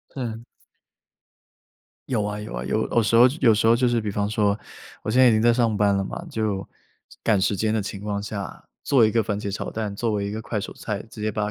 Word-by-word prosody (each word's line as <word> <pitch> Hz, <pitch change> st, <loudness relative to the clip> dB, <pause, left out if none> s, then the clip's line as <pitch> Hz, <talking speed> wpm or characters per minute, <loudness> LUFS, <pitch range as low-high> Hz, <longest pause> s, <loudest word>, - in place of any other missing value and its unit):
嗯。 115 Hz, -3 st, -5 dB, 1.6 s
有 115 Hz, -5 st, 0 dB
啊， 105 Hz, 0 st, -3 dB
有 105 Hz, -, -7 dB
啊， -, -, -4 dB
有 -, -, 0 dB
有 115 Hz, -, +2 dB
时 115 Hz, -, +2 dB
候 120 Hz, -, +8 dB, 0.2 s
有 115 Hz, -4 st, +6 dB
时 110 Hz, +2 st, +2 dB
候 115 Hz, -, +6 dB
就 125 Hz, +2 st, +1 dB
是 120 Hz, -1 st, +2 dB
比 105 Hz, -, -3 dB
方 100 Hz, +1 st, -1 dB
说， 105 Hz, -2 st, +1 dB, 0.4 s
我 110 Hz, -, -3 dB
现 125 Hz, +3 st, +4 dB
在 130 Hz, -, +8 dB
已 -, -, +6 dB
经 110 Hz, -, +2 dB
在 120 Hz, +1 st, +5 dB
上 115 Hz, -2 st, +2 dB
班 100 Hz, -1 st, +3 dB
了 100 Hz, -, 0 dB
嘛， 170 Hz, -, -6 dB
就 105 Hz, -6 st, -2 dB, 0.6 s
赶 105 Hz, -3 st, +2 dB
时 100 Hz, +2 st, +1 dB
间 110 Hz, +3 st, 0 dB
的 110 Hz, -, +1 dB
情 100 Hz, 0 st, -6 dB
况 100 Hz, 0 st, -3 dB
下， 100 Hz, -4 st, -6 dB, 0.2 s
做 130 Hz, -5 st, +4 dB
一 110 Hz, -, +2 dB
个 115 Hz, -, +3 dB
番 105 Hz, -1 st, -2 dB
茄 100 Hz, -1 st, -4 dB
炒 100 Hz, -, -4 dB
蛋， 110 Hz, -2 st, -4 dB
作 115 Hz, +3 st, -1 dB
为 100 Hz, -1 st, -1 dB
一 100 Hz, -, -3 dB
个 110 Hz, +1 st, -4 dB
快 110 Hz, -, -4 dB
手 100 Hz, -, -6 dB
菜， 105 Hz, -2 st, -4 dB
直 110 Hz, -, -12 dB
接 110 Hz, -, 0 dB
把 105 Hz, 0 st, -1 dB
110 Hz, 270 characters per minute, -24 LUFS, 100-115 Hz, 1.6 s, 候